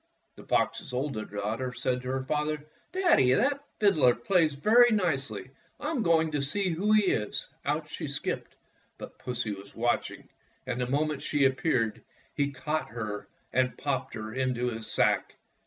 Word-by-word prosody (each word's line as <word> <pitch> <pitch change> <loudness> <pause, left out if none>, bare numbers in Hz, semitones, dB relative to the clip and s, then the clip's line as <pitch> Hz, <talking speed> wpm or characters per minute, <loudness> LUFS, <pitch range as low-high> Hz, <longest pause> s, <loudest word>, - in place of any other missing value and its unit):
The - - -13
fox's - - 0
oldest 125 -5 -3
daughter 110 +5 -2
said 125 0 -1
to 125 - -8
her 130 0 -1
father: 150 +1 -1 0.3
"Daddy, 345 - +4
that 280 - +2 0.2
fiddler 155 - +5
plays 160 +3 +2
very 230 - +6
nicely. 135 - 0 0.3
I 300 - -2
'm 285 -7 0
going 165 -4 +3
to 145 -2 0
see 190 +8 0
who 195 +6 0
he 215 -1 +6
is." 105 -2 -1 0.2
Out - - -1
she - - -5
skipped, - - -3 0.4
but - - -10
Pussy 125 -3 -2
was 100 0 -11
watch 120 +1 +1
ing, - - -12 0.4
and 125 - -2
the 125 - 0
moment 150 +2 0
she 145 -2 +2
appeared 130 -4 +1 0.3
he 145 0 +1
caught 155 +3 -2
her 110 -2 -5 0.3
and 130 0 +1
popped 135 -2 -2
her 110 -1 -6
into 125 -1 0
his 110 -1 -6
sack. - - +1
135 Hz, 170 wpm, -29 LUFS, 125-160 Hz, 0.4 s, very